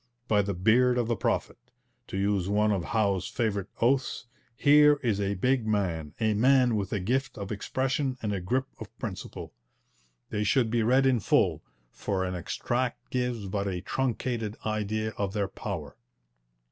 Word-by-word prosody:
'By 105 -3 +4
the 100 -1 -2
beard 120 +7 +4
of 120 -2 +1
the 120 - +1
prophet!' 95 - -2 0.4
to - - -5
use 100 -1 0
one 105 +1 +3
of 95 -5 -1
Howe's 100 -3 0
favourite 100 -4 -1
oaths 130 +1 +1 0.3
here 150 0 +6
is 105 -4 +1
a 100 0 0
big 125 +3 +1
man, 85 -8 -1
a 110 -1 +2
man 125 +2 +4
with 100 -3 -2
a 105 - 0
gift 130 +8 -1
of 100 -1 -5
expression 130 +5 -1
and 105 -3 -2
a 95 - -2
grip 130 +9 0
of - - -10
principle. - - -6 0.8
They 105 0 0
should 110 +2 +2
be 120 -1 +2
read 130 +4 +3
in 130 -3 +3
full, - - +2 0.3
for 95 -2 -2
an 90 - -3
extract 120 +8 -3
gives 125 -4 -1
but 100 +1 -2
a 90 -2 -3
truncated 120 -3 -2
idea 110 0 -1
of 100 -1 -1
their 100 -2 0
power. - - -6
110 Hz, 170 wpm, -28 LUFS, 100-125 Hz, 0.8 s, here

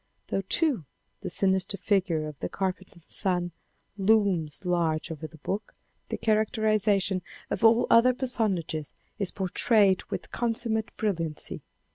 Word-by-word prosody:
Though 195 - 0
too 245 - +1 0.4
the - - -4
sinister 190 +2 +2
figure 180 -6 +1
of 150 -2 -9
the - - -3
carpenter's 185 -2 -4
son 180 -3 0 0.5
looms 195 -6 +2
large 165 -3 0
over 155 0 -6
the 160 - -16
book, 195 +8 -4 0.3
the - - -2
characterization 215 -3 +1 0.3
of - - -2
all 230 +2 +6
the - - +2
other 245 +2 +6
personages 200 - -1 0.3
is 200 -3 0
portrayed 195 0 +2
with - - -6
consummate 230 -2 -1
xiv. - - -10
INTRODUCTION 210 -3 +2
brilliancy. 150 - -8
195 Hz, 140 wpm, -27 LUFS, 175-220 Hz, 0.5 s, all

